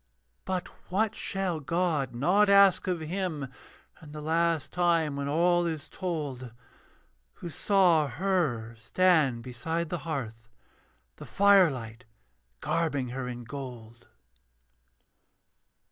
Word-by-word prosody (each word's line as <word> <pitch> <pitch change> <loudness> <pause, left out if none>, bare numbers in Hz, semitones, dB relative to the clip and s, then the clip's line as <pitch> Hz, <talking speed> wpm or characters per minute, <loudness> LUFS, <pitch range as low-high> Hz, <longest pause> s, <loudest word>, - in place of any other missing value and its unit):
But 185 -1 -2 0.2
what 205 +4 +1
shall 190 -4 -2
God 150 -4 -1
not 190 +11 +3
ask 200 -1 +5
of 180 -3 -1
him 160 -3 -3 0.5
In 150 -2 -12
the 150 - -7
last 165 0 0
time 170 -4 +1
when 140 0 -3
all 175 +3 +2
is 160 -3 -4
told, 145 -9 -5 0.8
Who 175 - -8
saw 175 -4 +3
her 140 -7 -1
stand 135 -1 +2
beside 160 +7 -3
the 175 - -3
hearth, 115 -9 -6 0.7
The - - -10
firelight 135 - +3 0.6
garbing 145 -6 -1
her 125 +1 -5
in 120 -1 -6
gold? 120 -3 -9
160 Hz, 110 wpm, -28 LUFS, 130-180 Hz, 0.8 s, ask